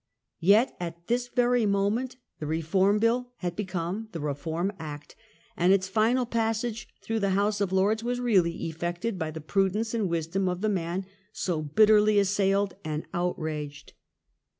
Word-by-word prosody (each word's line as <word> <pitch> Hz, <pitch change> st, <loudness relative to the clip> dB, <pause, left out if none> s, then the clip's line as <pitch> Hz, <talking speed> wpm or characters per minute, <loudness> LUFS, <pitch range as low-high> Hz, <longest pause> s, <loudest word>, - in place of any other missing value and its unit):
Yet 205 Hz, +8 st, +4 dB
at 170 Hz, -1 st, -6 dB
this 245 Hz, +3 st, 0 dB
very 245 Hz, -2 st, +2 dB
moment 205 Hz, +6 st, 0 dB, 0.2 s
the 150 Hz, -, -4 dB
Reform 175 Hz, +6 st, +2 dB
Bill 245 Hz, +3 st, +1 dB
had 175 Hz, -6 st, -4 dB
become 190 Hz, +2 st, -3 dB
the 165 Hz, -, -4 dB
Eeform 160 Hz, +6 st, -2 dB
Act, 150 Hz, -2 st, -8 dB, 0.4 s
and 175 Hz, +2 st, +3 dB
its 190 Hz, -1 st, +3 dB
final 225 Hz, +5 st, +2 dB
passage 225 Hz, -1 st, -1 dB, 0.2 s
through 225 Hz, 0 st, -1 dB
the 200 Hz, -1 st, +1 dB
House 205 Hz, 0 st, +1 dB
of 195 Hz, -2 st, 0 dB
Lords 205 Hz, +4 st, +2 dB
was 245 Hz, +1 st, -1 dB
really 190 Hz, -9 st, +2 dB
effected 175 Hz, +6 st, -3 dB
by 160 Hz, -2 st, -2 dB
the 160 Hz, 0 st, -7 dB
prudence 195 Hz, +7 st, 0 dB
and 215 Hz, -5 st, 0 dB
wisdom 170 Hz, +3 st, -1 dB
of 180 Hz, 0 st, -3 dB
the 215 Hz, -, +1 dB
man 185 Hz, -1 st, -2 dB, 0.3 s
so 175 Hz, -6 st, -2 dB
bitterly 210 Hz, +6 st, +4 dB
assailed 200 Hz, -1 st, +2 dB
and 155 Hz, 0 st, -3 dB
outraged. 155 Hz, -5 st, -3 dB
195 Hz, 155 wpm, -27 LUFS, 170-220 Hz, 0.4 s, Yet